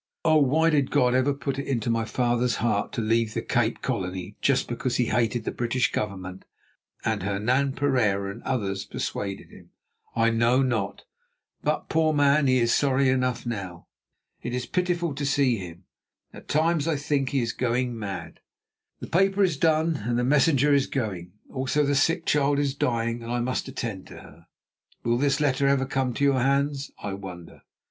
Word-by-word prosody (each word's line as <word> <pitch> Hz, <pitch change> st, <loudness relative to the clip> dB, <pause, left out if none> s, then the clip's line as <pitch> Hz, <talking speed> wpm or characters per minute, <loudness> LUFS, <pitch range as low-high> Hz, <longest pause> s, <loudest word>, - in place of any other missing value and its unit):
"Oh, 155 Hz, -1 st, +5 dB
why 155 Hz, +4 st, +3 dB
did 140 Hz, -3 st, +2 dB
God 125 Hz, -4 st, +3 dB
ever 130 Hz, +2 st, +3 dB
put 140 Hz, -1 st, -3 dB
it 140 Hz, -, -5 dB
into 120 Hz, -4 st, -1 dB
my 115 Hz, -1 st, 0 dB
father's 120 Hz, 0 st, 0 dB
heart 110 Hz, -3 st, 0 dB
to 115 Hz, -, -2 dB
leave 115 Hz, 0 st, +1 dB
the -, -, -2 dB
Cape -, -, 0 dB
Colony 90 Hz, +2 st, -3 dB
just 140 Hz, -2 st, +2 dB
because 120 Hz, +1 st, -2 dB
he 125 Hz, -, +2 dB
hated 115 Hz, +1 st, 0 dB
the -, -, -2 dB
British 120 Hz, +1 st, 0 dB
Government 95 Hz, -3 st, -4 dB, 0.6 s
and -, -, 0 dB
Hernan 120 Hz, +8 st, 0 dB
Pereira 110 Hz, -9 st, +1 dB
and -, -, -10 dB
others 100 Hz, -7 st, -2 dB
persuaded 100 Hz, -1 st, -5 dB
him? -, -, -16 dB, 0.5 s
I 115 Hz, 0 st, +3 dB
know 120 Hz, +3 st, +3 dB
not, 110 Hz, -6 st, -2 dB, 0.6 s
but, -, -, -1 dB
poor 160 Hz, -1 st, +2 dB
man, 145 Hz, 0 st, +3 dB
he 130 Hz, 0 st, +4 dB
is 120 Hz, -1 st, +2 dB
sorry 135 Hz, -1 st, +2 dB
enough 125 Hz, -2 st, 0 dB
now. 100 Hz, -7 st, -5 dB, 0.6 s
It 120 Hz, -, -4 dB
is 125 Hz, -1 st, -2 dB
pitiful 175 Hz, -2 st, -1 dB
to 145 Hz, -, -5 dB
see 135 Hz, -3 st, +2 dB
him; 90 Hz, -2 st, -9 dB, 0.5 s
at -, -, -12 dB
times 160 Hz, 0 st, +1 dB
I 165 Hz, -, +1 dB
think 140 Hz, -1 st, -1 dB
that -, -, -3 dB
he 135 Hz, -, +2 dB
is 115 Hz, -, -2 dB
going 125 Hz, 0 st, -1 dB
mad. 100 Hz, -4 st, -6 dB, 0.6 s
"The -, -, -6 dB
paper 195 Hz, +3 st, +2 dB
is 180 Hz, -5 st, +2 dB
done, 160 Hz, +2 st, +2 dB
and 120 Hz, 0 st, 0 dB
the 125 Hz, -, +1 dB
messenger 145 Hz, +1 st, +3 dB
is 140 Hz, -1 st, +3 dB
going; 95 Hz, -9 st, -4 dB
also 135 Hz, +3 st, 0 dB
the 145 Hz, -, +1 dB
sick 165 Hz, +5 st, +2 dB
child 145 Hz, -1 st, +2 dB
is 140 Hz, -1 st, 0 dB
dying 115 Hz, -3 st, -1 dB
and 115 Hz, 0 st, -6 dB
I 120 Hz, -, 0 dB
must 125 Hz, +2 st, -2 dB
attend 115 Hz, -7 st, -5 dB
to -, -, -11 dB
her. 85 Hz, +3 st, -15 dB, 0.6 s
Will 120 Hz, +1 st, +1 dB
this 140 Hz, +1 st, +2 dB
letter 140 Hz, -2 st, +2 dB
ever 140 Hz, -1 st, +2 dB
come 135 Hz, -1 st, -1 dB
to -, -, -1 dB
your 140 Hz, -2 st, +3 dB
hands, 140 Hz, +2 st, 0 dB
I 100 Hz, -1 st, -3 dB
wonder? 90 Hz, -3 st, -9 dB
125 Hz, 185 wpm, -26 LUFS, 115-140 Hz, 0.6 s, Oh